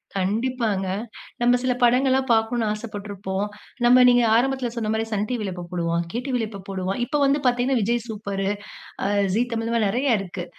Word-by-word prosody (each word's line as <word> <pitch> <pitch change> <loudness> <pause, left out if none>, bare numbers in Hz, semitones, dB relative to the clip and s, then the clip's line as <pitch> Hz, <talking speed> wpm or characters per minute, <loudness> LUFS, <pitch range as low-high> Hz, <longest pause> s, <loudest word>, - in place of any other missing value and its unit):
கண்டிப்பாங்க. 210 0 0 0.5
நம்ம 245 +1 +4
சில 255 -1 +2
படங்கள்லாம் 260 +2 +3
பார்க்கணும் 225 0 +1
ஆசப்பட்டுருப்போம். 205 -2 -4 0.4
நமம 250 +1 +7
நீங்க 245 -1 +4
ஆரம்பத்தில 260 0 +1
சொன்னமாரி 220 0 -1
சன் 210 +1 0
டிவில 215 -6 -2
எப்போ 175 -1 -7
போடுவான். 170 -1 0
கே 240 - -2
டிவில 245 -5 -1
எப்போ 200 -2 -9
போடுவான்? 190 +3 -3
இப்ப 295 +4 -1
வந்து 280 +2 +3
பார்த்தீங்கன்னா, 245 +1 +2
விஜய் 235 +2 0
சூப்பர், 200 -2 -3 0.6
ஆ - - +1 0.3
ஜீ 235 - +3
தமிழ் 225 0 -2
இந்தமாரி 230 -3 +1
நிறைய 245 -2 +2
இருக்கு. 180 -2 -6
225 Hz, 165 wpm, -23 LUFS, 200-245 Hz, 0.6 s, நமம